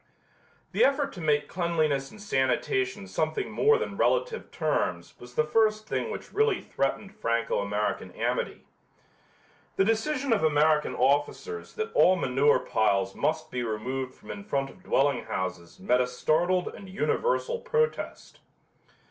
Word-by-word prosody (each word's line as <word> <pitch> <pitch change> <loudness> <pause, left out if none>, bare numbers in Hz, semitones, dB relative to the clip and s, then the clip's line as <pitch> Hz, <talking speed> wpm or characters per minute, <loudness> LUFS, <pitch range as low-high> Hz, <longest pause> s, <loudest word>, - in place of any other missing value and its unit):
The - - +3
effort 280 +1 +2
to 180 - -8
make 150 -2 +1
cleanliness 155 -6 0
and 215 - -14
sanitation 210 - 0
something 410 -2 -2
more 445 +1 +4
than 460 - -4
relative - - +1
terms 145 - -1
was 120 0 -13
the 155 - +3
first 215 +6 +2
thing - - -2
which - - -7
really 435 -2 +2
threatened 195 +9 -2
Franco 115 - 0
American 105 +1 -2
amity. - - -2 1.1
The 195 - +3
decision 255 +4 +1
of 210 - +1
American 150 0 +3
officers 145 - 0
that 445 0 -3
all 185 - +6
manure 140 -3 +3
piles 100 -3 +1
must 155 0 -1
be 125 - -2
removed 125 +4 -3
from - - -10
in 205 - -7
front 135 -10 -2
of - - -19
dwelling 140 -2 +1
houses 90 -2 -4
met 125 +6 +2
a 125 - +1
startled 170 +8 +1
and 195 - -11
universal 470 - 0
protest. 470 -1 -2
160 Hz, 145 wpm, -28 LUFS, -, 1.1 s, all